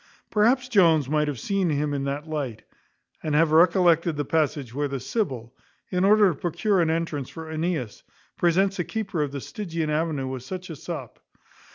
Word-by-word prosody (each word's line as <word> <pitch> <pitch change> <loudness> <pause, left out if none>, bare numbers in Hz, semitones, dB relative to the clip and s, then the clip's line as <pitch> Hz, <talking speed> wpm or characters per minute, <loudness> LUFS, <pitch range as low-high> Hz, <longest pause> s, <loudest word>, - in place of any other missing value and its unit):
Perhaps 245 +5 +3
Jones 165 - +4
might 150 +1 +1
have 140 -5 -3
seen 195 - 0
him 145 0 0
in 140 -1 -2
that 140 +3 -3
light, 140 -8 -4 0.6
and 155 -2 -1
have 160 0 +4
recollected 170 -1 +4
the 145 - -1
passage 145 -5 0
where 145 +2 -1
the 135 -1 -4
Sibyl, 130 - -3 0.4
in 180 -1 +1
order 205 0 +6
to - - -5
procure 190 +3 +1
an 165 - +2
entrance 160 -5 -2
for 160 -1 -8
Aeneas, 160 - -2 0.3
presents 190 +3 +2
the 175 - 0
keeper 195 -5 -3
of 145 -2 -1
the 140 - -4
Stygian 165 - -4
avenue 150 -3 -1
with 130 -1 -5
such 185 +6 -7
a - - -6
sop. 150 -5 -7
160 Hz, 185 wpm, -25 LUFS, 145-180 Hz, 0.6 s, order